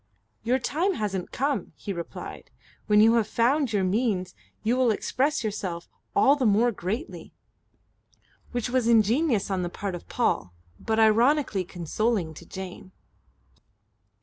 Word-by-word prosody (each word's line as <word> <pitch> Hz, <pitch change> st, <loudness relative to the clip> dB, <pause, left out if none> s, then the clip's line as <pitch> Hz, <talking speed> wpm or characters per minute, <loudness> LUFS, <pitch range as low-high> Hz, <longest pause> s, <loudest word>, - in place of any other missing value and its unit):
"Your 250 Hz, +3 st, +1 dB
time 345 Hz, +8 st, 0 dB
hasn't 195 Hz, -, -3 dB
come," 280 Hz, +2 st, -2 dB
he 200 Hz, -, -5 dB
replied. 170 Hz, -2 st, -8 dB, 0.4 s
"When 210 Hz, -1 st, +5 dB
you 225 Hz, +1 st, +6 dB
have 225 Hz, -, +1 dB
found 260 Hz, +2 st, +1 dB
your 205 Hz, -3 st, +1 dB
means 185 Hz, -2 st, 0 dB, 0.3 s
you 230 Hz, +3 st, +2 dB
will 255 Hz, -2 st, +3 dB
express 260 Hz, +6 st, 0 dB
yourself 190 Hz, -5 st, -4 dB, 0.3 s
all 280 Hz, -, +5 dB
the 280 Hz, -, -2 dB
more 220 Hz, +4 st, +3 dB
greatly." 220 Hz, -, -5 dB, 1.2 s
Which 245 Hz, -1 st, -2 dB
was 255 Hz, -2 st, +1 dB
ingenious 230 Hz, 0 st, +3 dB
on 190 Hz, -1 st, 0 dB
the 175 Hz, -, -2 dB
part 195 Hz, +2 st, -5 dB
of 175 Hz, -, -8 dB
Paul, 90 Hz, -1 st, -1 dB, 0.2 s
but 220 Hz, 0 st, -1 dB
ironically 225 Hz, 0 st, +3 dB
consoling 180 Hz, +1 st, -1 dB
to -, -, -13 dB
Jane. 190 Hz, 0 st, -8 dB
220 Hz, 140 wpm, -26 LUFS, 190-250 Hz, 1.2 s, you